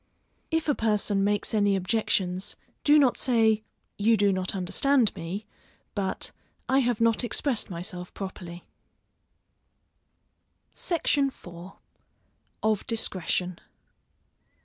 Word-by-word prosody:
If 325 -1 0
a 295 - +4
person 210 -4 +1
makes 205 +2 0
any 205 -2 +3
objections, 190 -1 0 0.3
do 295 +1 +6
not 270 -4 +4
say, 225 -4 +3 0.4
You 225 +2 +4
do 200 0 +3
not 185 +1 -2
understand 230 +6 +2
me, 185 +6 -5 0.5
but, 195 -2 -2 0.4
I 265 - +4
have 245 -4 +1
not 230 +1 +3
expressed 245 -1 -1
myself 180 0 -6
properly. 180 -3 -7 2.1
SECTION 295 -5 +1
IV. 175 -7 -10 0.9
_Of 215 -2 +1
Discretion. 185 -5 0
210 Hz, 100 wpm, -27 LUFS, 185-235 Hz, 2.1 s, do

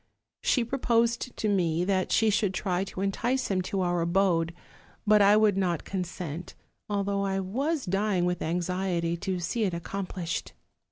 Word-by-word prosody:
She 250 - +2
proposed 235 -1 0
to 220 - -1
me 175 -4 +1
that 190 -1 0
she 220 -1 +4
should 200 -2 +1
try 185 -1 0
to 190 - -6
entice 240 +6 0
him 185 -1 +1
to 190 +1 -2
our 175 -1 +1
abode; 170 -1 +2 0.5
but 210 0 +5
I 205 +1 +6
would 215 -2 +4
not 175 -4 0
consent, 175 -3 -5 0.3
although 200 -1 0
I 195 -1 0
was 270 - -1
dying 195 -1 +1
with 180 0 -1
anxiety 175 0 -1
to 185 +1 -2
see 220 +7 -1
it 185 -4 0
accomplished. 180 -1 -4
190 Hz, 160 wpm, -28 LUFS, 175-210 Hz, 0.5 s, I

